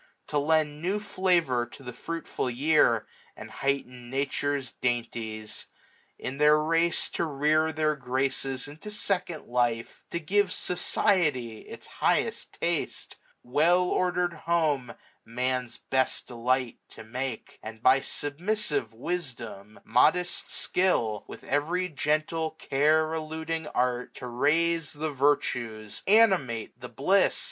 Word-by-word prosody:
To 145 - +1
lend 150 0 +1
new 190 +5 0
flavour 175 -12 +1
to 135 - -14
the 125 -1 -7
fruitful 165 0 -4
year, 125 -3 +3 0.3
And - - -10
heighten 125 -3 -2
Nature's 140 0 -1
dainties; 115 -3 -3 0.5
in 135 +2 -5
their 150 0 +6
race 165 +2 +2
600 - - -3
To 170 - +1
rear 155 +2 +2
their 155 -1 +1
graces 130 0 -2
into 155 +8 -9
second 190 -6 -2
life; 120 -1 -1
To 170 - -2
give 195 +4 +1
Society 155 - +1
its - - -9
highest - - 0
taste; - - -2 0.3
Well 165 +8 +3
ordered 180 -1 +1
Home 155 -7 0 0.3
Man's 125 +1 -2
best 130 0 0
delight 125 +1 -1
to - - -11
make 125 +1 -4
j - - -20
And 110 +1 -9
by 130 +2 +6
submissive 145 - -1
wisdom, 115 - -5
modest 155 +10 +2
skill. 115 - 0
With - - -10
every 170 +6 0
gentle 155 +1 0
care 155 +1 +2
eluding 160 0 -3
art, 125 -3 -1
605 - - -9
To 125 - -6
raise 155 +6 +1
the 155 +1 -3
virtues, 120 -6 0
animate 190 - +3
the - - -7
bliss. - - +3
145 Hz, 125 wpm, -28 LUFS, 125-165 Hz, 0.5 s, their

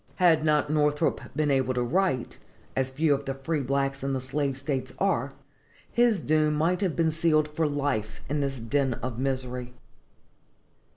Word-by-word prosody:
Had 165 -4 +4
not 150 -1 +2
Northrop 150 +1 +1
been 150 -1 +1
able 130 -2 +1
to 125 - +1
write, 150 -1 0 0.4
as 130 0 0
few 145 +3 +2
of 140 0 -2
the 135 - -3
free 150 +3 -2
blacks 135 0 -1
in 135 0 -1
the 130 - 0
slave 135 +1 -2
states 135 -1 -3
are, 140 -9 0 0.6
his 235 -4 +3
doom 155 -1 +2
might 170 +5 +1
have 185 -6 0
been 165 -1 +2
sealed 155 -1 +2
for 155 +1 -1
life 140 -7 -2
in 150 +1 -1
this 140 -1 -1
den 130 +2 0
of 125 -2 -5
misery. 125 -2 -3
140 Hz, 170 wpm, -27 LUFS, 130-155 Hz, 0.6 s, Had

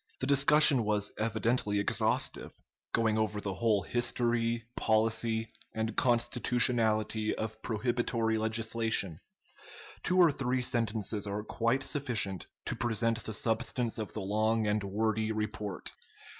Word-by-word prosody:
The - - -1
discussion 140 -1 +6
was 105 -1 -1
evidently 110 -1 0
exhaustive, 100 - -1 0.4
going 110 -1 +1
over 105 -1 -1
the 100 -1 -4
whole 105 0 +1
history, 120 -1 0
policy, 110 +1 +1 0.3
and 110 0 -2
constitutionality 115 -3 +1
of 110 0 -5
prohibitory 115 -1 -1
legislation. 110 -5 0 0.8
Two 180 - 0
or 175 -4 +6
three 130 -2 -1
sentences 110 -3 -1
are 100 +1 -3
quite 115 +4 0
sufficient 115 -11 -2 0.2
to - - -3
present 115 -1 0
the 110 - -3
substance 115 +2 -1
of 110 - -5
the 105 - -4
long 110 +3 0
and 105 0 0
wordy 110 +2 -1
report. 105 -2 -4
110 Hz, 120 wpm, -30 LUFS, 105-120 Hz, 0.8 s, discussion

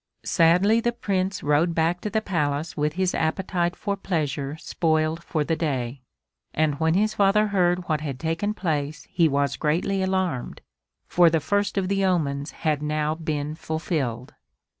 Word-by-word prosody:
Sadly 180 +6 +4
the 240 +1 0
Prince 190 -4 -2
rode 150 +4 +2
back 170 +2 +1
to 210 - -3
the 220 +2 -1
Palace 155 -4 -1
with 150 0 0
his 185 +1 0
appetite 175 +2 0
for 200 -1 -2
pleasure 150 -6 -2
spoiled 160 0 0
for 155 -3 -1
the 165 +2 0
day, 135 -5 -2 0.5
and 150 -2 +1
when 160 +1 +2
his 215 +2 +2
father 205 +1 +3
heard 180 -2 +1
what 155 -2 0
had 140 -4 -4
taken 165 +6 -1
place 150 -5 -2
he 165 -2 +3
was 140 0 0
greatly 175 +6 0
alarmed, 190 -8 -1 0.4
for 175 -1 +5
the 165 0 +2
first 205 +7 0
of 190 -1 +1
the 195 0 +1
omens 150 -6 0 0.2
had 150 -2 +2
now 150 0 0
been 155 -2 -3
fulfilled. 150 -7 -3
165 Hz, 160 wpm, -24 LUFS, 150-190 Hz, 0.5 s, for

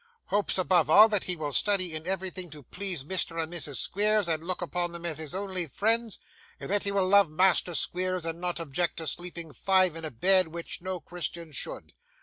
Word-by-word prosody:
Hopes, 205 -1 +1
above 180 -5 +2
all, 210 +7 +8
that 210 -3 0
he 180 - +1
will 150 -3 -4
study 185 +2 +3
in 155 +2 -7
everything 185 -1 -3
to 150 -1 -11
please 185 - -1
Mr. 165 +1 -2
and 165 +1 -3
Mrs 150 -5 -1
Squeers, 210 +5 +2
and 160 -1 -1
look 185 +1 -3
upon 175 0 -1
them 170 0 -7
as 160 -3 -3
his 155 +1 -4
only 190 -3 -3
friends; 225 - 0 0.4
and - - -7
that 205 0 +2
he 200 - -2
will 195 -2 +1
love 200 -2 +5
Master 180 +1 +2
Squeers; 185 0 0
and 165 +1 -5
not 180 -1 -2
object 165 +2 -2
to 160 - -5
sleeping 170 -1 -3
five 185 -2 +2
in 165 - -7
a 155 - -3
bed, 185 +8 +3
which 170 +1 -7
no 185 0 -4
Christian 170 0 -4
should. 145 - -5
175 Hz, 210 wpm, -28 LUFS, 165-190 Hz, 0.4 s, all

